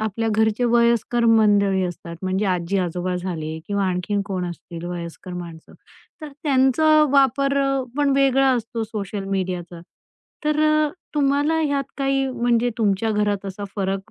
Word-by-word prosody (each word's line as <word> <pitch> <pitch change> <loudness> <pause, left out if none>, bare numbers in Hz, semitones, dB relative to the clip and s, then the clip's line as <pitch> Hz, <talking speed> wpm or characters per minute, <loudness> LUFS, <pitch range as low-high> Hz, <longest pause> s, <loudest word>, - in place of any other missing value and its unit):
आपल्या 220 +1 -1
घरचे 220 +2 +1
वयस्कर 235 0 +2
मंडळी 205 -4 +4
असतात, 170 -1 -6
म्हणजे 190 +2 -1
आजी-आजोबा 180 0 -1
झाले, 160 -3 -4
किंवा 200 -1 -1
आणखीन 185 +2 -1
कोण 185 -3 -3
असतील 170 0 -9
वयस्कर 175 +1 -7
माणसं, 170 -2 -9 0.5
तर 305 - -7
त्यांचा 300 +2 +4
वापर 275 0 +3
अ, 275 -1 0
पण 290 -1 +2
वेगळा 270 0 +4
असतो 230 -1 -3
सोशल 205 -2 -5
मीडियाचा. 180 -3 -3 0.6
तर 300 0 +1
अ, 305 0 +3 0.3
तुम्हाला 290 +2 +2
ह्यात 285 -3 0
काही 270 0 +1
म्हणजे 240 -1 +1
तुमच्या 215 +1 +1
घरात 205 -1 0
असा 195 +1 -6
फरक 195 -1 -2
210 Hz, 140 wpm, -22 LUFS, 185-270 Hz, 0.6 s, मंडळी